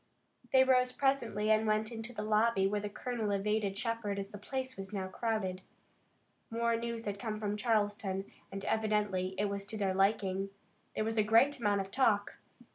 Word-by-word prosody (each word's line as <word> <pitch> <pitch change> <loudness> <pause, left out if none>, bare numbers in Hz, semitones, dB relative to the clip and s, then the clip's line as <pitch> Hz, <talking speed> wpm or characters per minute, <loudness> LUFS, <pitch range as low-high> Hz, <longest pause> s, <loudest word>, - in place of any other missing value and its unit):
They 260 0 +7
rose 255 -1 +4
presently 235 -6 +1
and 220 0 +3
went 215 +1 +1
into 230 +1 -6
the 215 -3 -5
lobby, 215 -1 +3
where 205 +2 +1
the 205 - -3
colonel 230 0 -3
evaded 200 0 0
Shepard, 230 -2 -2
as 195 0 -4
the 205 - -9
place 260 +3 -4
was 195 0 -7
now 195 -2 -2
crowded. 190 -3 -2 0.9
More 230 0 +1
news 230 0 -4
had 200 -1 -3
come 215 -1 -3
from 210 -1 -1
Charleston 205 -3 0 0.3
and 195 0 -5
evidently 210 -4 0
it 205 - +1
was 200 0 -3
to 220 - -3
their 195 -2 +1
liking. 195 0 +1 0.5
There - - 0
was 225 +1 -2
a - - +5
great 240 +7 +4
amount 205 -3 +2
of 195 0 -7
talk. 210 -6 +2
210 Hz, 185 wpm, -33 LUFS, 200-230 Hz, 0.9 s, They